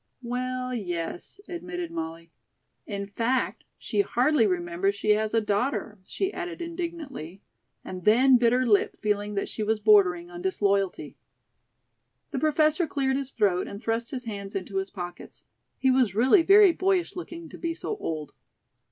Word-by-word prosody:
"Well, 255 +1 -3
yes," 175 - -4
admitted 180 - -5
Molly. 165 0 -6 0.6
"In 200 -2 -4
fact, 230 +6 -1
she - - 0
hardly 260 - +2
remembers 180 +2 0
she 210 +1 +1
has 215 0 +2
a 225 - +4
daughter," 210 0 -1
she 385 - -3
added 355 -1 -5
indignantly, 330 - -6 0.4
and 185 -1 -7
then 250 +6 +6
bit 235 -1 +3
her 255 +1 +2
lip, 210 -4 +2
feeling 205 0 -1
that 200 - -1
she - - -6
was 215 +1 +1
bordering 185 -5 +4
on 175 0 -8
disloyalty. 195 0 0 1.1
The - - -2
Professor 310 +2 +2
cleared 270 -2 0
his 275 -1 -3
throat 200 -7 +1
and 200 - -7
thrust 230 +1 -2
his 255 -2 -5
hands 200 -3 -6
into 195 0 -3
his 195 0 -1
pockets. 175 -2 -9 0.3
He 265 - +3
was 250 -7 +2
really 260 - +5
very 395 +2 +7
boyish 370 0 0
looking 340 -2 -7
to - - -11
be 330 -1 -2
so 430 - -4
old. 155 - -5
220 Hz, 160 wpm, -26 LUFS, 195-275 Hz, 1.1 s, very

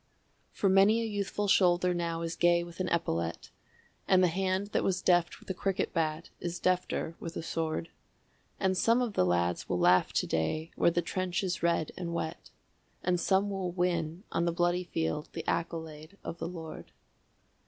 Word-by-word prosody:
For 200 - 0
many 195 +4 +5
a 230 - -1
youthful 205 -1 -2
shoulder 180 -2 +4
now 170 -1 -2
is 165 0 -3
gay 175 0 +3
with 170 +1 -11
an 185 - 0
epaulet, 85 - -1 0.6
And 185 -1 +5
the 180 - +5
hand 190 +3 -1
that - - 0
was 185 -1 +1
deft 175 -1 +2
with - - -19
a - - -1
cricket 195 +1 -1
bat 160 0 -1
is 175 0 -4
defter 185 -2 0
with 165 0 -6
a - - -4
sword, 165 0 -2 0.7
And 190 -1 +2
some 230 +6 +3
of 230 -4 -3
the 90 - +2
lads 85 0 0
will 90 - +1
laugh 90 +1 +4
to - - +1
day 155 - -1
where - - +4
the 170 0 0
trench 185 +1 -2
is 185 -2 -2
red 170 -2 +1
and 170 -2 -4
wet, 160 0 -4 0.5
And 180 -1 +1
some 195 +3 +2
will 190 -2 -2
win 175 -1 -1
on 170 - +1
the 170 - +2
bloody 175 +1 +1
field 80 - -2
the - - -6
accolade 160 +1 -3
of 165 - -6
the - - -3
Lord. 165 -3 -8
175 Hz, 185 wpm, -30 LUFS, 165-185 Hz, 0.7 s, many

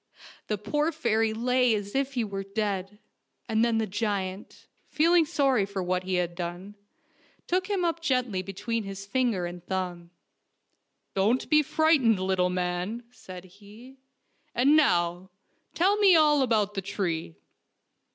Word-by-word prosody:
The 210 - -1
poor 295 +10 -1
fairy 225 -7 0
lay 250 +1 +2
as 205 -1 -5
if 275 0 -1
he 240 - +1
were 200 -2 -4
dead, 200 -1 -3 0.5
and 220 0 +1
then 235 -1 +2
the 220 - +1
giant, 200 -2 -4 0.2
feeling 330 +1 +3
sorry 275 -8 +2
for 195 -1 -4
what 180 0 -1
he 185 0 -1
had 175 -1 -1
done, 175 +3 -6 0.7
took 370 +2 -1
him 385 -4 0
up 335 0 -1
gently 250 - 0
between 200 +5 -3
his 195 0 -7
finger 230 -5 0
and 175 0 -7
thumb. 180 -2 -4 0.5
" - - -50
Don't 215 +7 +1
be 305 0 +6
frightened, 290 - +3
little 185 -1 +1
man,'' 180 +5 -3
said 185 -7 -11
he, 210 +8 -16 0.3
" - - -43
and 275 +5 +4
now, 175 - +2 0.5
tell 390 +4 +3
me 400 -4 +6
all 300 -2 +4
about 215 -5 +1
the 195 - -3
tree." 175 - -3
210 Hz, 150 wpm, -27 LUFS, 185-260 Hz, 0.7 s, be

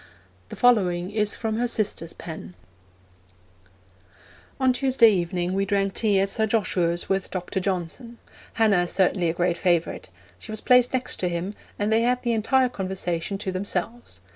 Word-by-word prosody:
The - - -7
following 185 -7 +2
is 210 -1 +1
from 220 -1 -2
her 245 +1 0
sister's 195 -7 -2
pen: 90 - -9 2.0
On 260 -1 +3
Tuesday 250 -3 +4
evening 175 -1 -1
we 195 +1 +1
drank 195 -1 0
tea 205 -4 +2
at 195 +1 +1
Sir 220 +1 +1
Joshua's 180 -5 0
with 195 0 -1
Dr. 185 0 -3
Johnson. 190 +6 -4 0.4
Hannah 215 -5 +3
is - - -4
certainly 185 -2 +2
a - - 0
great 175 0 0
favourite. 170 - 0 0.3
She - - -9
was 215 - -4
placed 250 +1 +4
next 255 -1 -2
him, 180 +2 -2 0.2
and 210 +2 0
they 225 - +3
had 250 +1 +1
the 240 -1 +1
entire 255 +4 +2
conversation 190 -3 -3
to 195 -1 -4
themselves. 185 - -4
195 Hz, 160 wpm, -24 LUFS, 175-225 Hz, 2.0 s, Tuesday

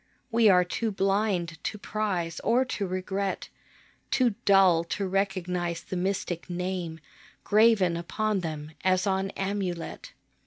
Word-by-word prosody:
We 225 -1 +5
are 180 -2 +6
too 220 +5 -2
blind 195 -4 0
to 210 - -3
prize 190 -6 -2
or 245 +3 +2
to 205 -6 -3
regret, 190 +1 -3 0.6
Too 245 -4 +2
dull 190 -4 +5
to 195 +3 -2
recognize 180 -3 -1
the - - -5
mystic 185 -1 -2
Name 180 -2 -3 0.4
Graven 210 -5 +4
upon 210 +5 -1
them 155 -3 -5
as 185 0 +2
on 190 0 0
amulet. 195 -3 -3
190 Hz, 125 wpm, -27 LUFS, 175-205 Hz, 0.6 s, are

